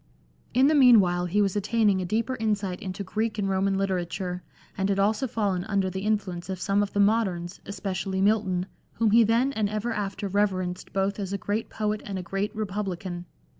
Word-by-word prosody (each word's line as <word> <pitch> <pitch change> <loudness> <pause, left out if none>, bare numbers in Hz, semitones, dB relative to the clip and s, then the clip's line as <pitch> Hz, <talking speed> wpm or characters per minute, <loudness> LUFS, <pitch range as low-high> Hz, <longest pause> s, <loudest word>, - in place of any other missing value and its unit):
In 260 +2 +5
the 300 - +4
meanwhile 200 -11 +5
he 205 +4 +2
was 195 -1 0
attaining 205 -1 +2
a - - -2
deeper 225 +7 -1
insight 205 -4 -1
into 190 +1 -5
Greek 215 +3 -2
and 200 -2 0
Roman 195 0 +1
literature, 180 -1 -2 0.3
and 195 0 -1
had 195 - +1
also 215 +6 +2
fallen 200 -6 -1
under 195 -2 0
the 190 +1 -4
influence 195 -4 -1
of 190 -1 -3
some 200 +2 +1
of 205 - -2
the 205 - 0
moderns, 195 -4 +1
especially 195 -1 -3
Milton, 195 -3 +2 0.3
whom 225 -2 +1
he 230 +2 +7
then 235 +5 +2
and 215 -5 0
ever 215 +3 -2
after 205 -1 -3
reverenced 185 -2 -1
both 195 +2 -1
as 195 -1 -3
a - - 0
great 205 +3 -2
poet 215 -1 -2
and 195 -2 -5
a 185 - -4
great 195 +4 -2
republican. 190 -4 -4
200 Hz, 195 wpm, -26 LUFS, 185-215 Hz, 0.3 s, he